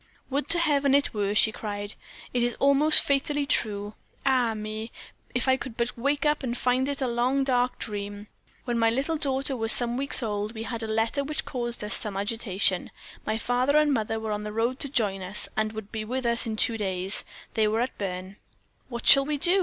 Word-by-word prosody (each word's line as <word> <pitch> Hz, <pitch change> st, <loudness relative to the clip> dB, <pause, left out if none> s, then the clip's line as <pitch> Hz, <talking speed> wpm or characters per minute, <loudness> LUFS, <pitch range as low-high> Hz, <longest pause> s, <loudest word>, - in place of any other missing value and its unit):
"Would 280 Hz, +1 st, -1 dB
to 345 Hz, -, +8 dB
Heaven 285 Hz, -4 st, +3 dB
it 285 Hz, -, +2 dB
were!" 205 Hz, -1 st, -1 dB
she 220 Hz, -, +4 dB
cried. 205 Hz, -1 st, -5 dB, 0.4 s
"It 245 Hz, -, 0 dB
is 240 Hz, 0 st, 0 dB
all 280 Hz, 0 st, +3 dB
most 305 Hz, +3 st, +7 dB
fatally 285 Hz, +1 st, 0 dB
true. 210 Hz, -6 st, 0 dB, 0.3 s
Ah! 250 Hz, -4 st, +2 dB
me, 215 Hz, +1 st, -6 dB, 0.4 s
if 245 Hz, -, 0 dB
I 260 Hz, 0 st, +4 dB
could 260 Hz, -4 st, -8 dB
but 240 Hz, 0 st, -2 dB
wake 280 Hz, +4 st, -1 dB
up 300 Hz, 0 st, +2 dB
and 245 Hz, -2 st, -3 dB
find 255 Hz, +2 st, +1 dB
it 280 Hz, -1 st, -3 dB
a -, -, 0 dB
long, 250 Hz, +3 st, +1 dB
dark 250 Hz, -2 st, 0 dB
dream! 205 Hz, -1 st, -5 dB, 0.4 s
When 240 Hz, -2 st, -1 dB
my 225 Hz, 0 st, +4 dB
little 270 Hz, +8 st, -1 dB
daughter 275 Hz, -1 st, -1 dB
was 225 Hz, -2 st, +2 dB
some 240 Hz, 0 st, +3 dB
weeks 275 Hz, -1 st, +4 dB
old, 210 Hz, 0 st, -3 dB
we 220 Hz, -, -5 dB
had 230 Hz, 0 st, -5 dB
a 225 Hz, -, -4 dB
letter 225 Hz, +6 st, 0 dB
which 300 Hz, +2 st, -4 dB
caused 240 Hz, -3 st, -3 dB
us 210 Hz, -, +2 dB
some 210 Hz, -4 st, -2 dB
agitation; 200 Hz, -3 st, 0 dB, 0.4 s
my 215 Hz, -, 0 dB
father 250 Hz, +5 st, +1 dB
and 300 Hz, -1 st, +3 dB
mother 225 Hz, -2 st, -1 dB
were 220 Hz, -1 st, -4 dB
on 210 Hz, 0 st, -2 dB
the 210 Hz, 0 st, -6 dB
road 235 Hz, +4 st, -1 dB
to 280 Hz, -, -4 dB
join 205 Hz, -7 st, 0 dB
us, 190 Hz, +3 st, -4 dB
and 215 Hz, 0 st, 0 dB
would 215 Hz, -2 st, -8 dB
be 220 Hz, -1 st, -4 dB
with 255 Hz, +3 st, -4 dB
us 235 Hz, 0 st, +2 dB
in 220 Hz, -, -3 dB
two 225 Hz, +1 st, +1 dB
days. 190 Hz, -1 st, -3 dB, 0.3 s
They 220 Hz, -1 st, +2 dB
were 215 Hz, +1 st, 0 dB
then 235 Hz, -, +2 dB
at 255 Hz, -, -6 dB
Berne. 185 Hz, 0 st, -5 dB, 0.5 s
"What 235 Hz, -2 st, -6 dB
shall 275 Hz, -, +9 dB
we 300 Hz, 0 st, -2 dB
do?" 355 Hz, +7 st, +3 dB
235 Hz, 225 wpm, -26 LUFS, 215-270 Hz, 0.5 s, shall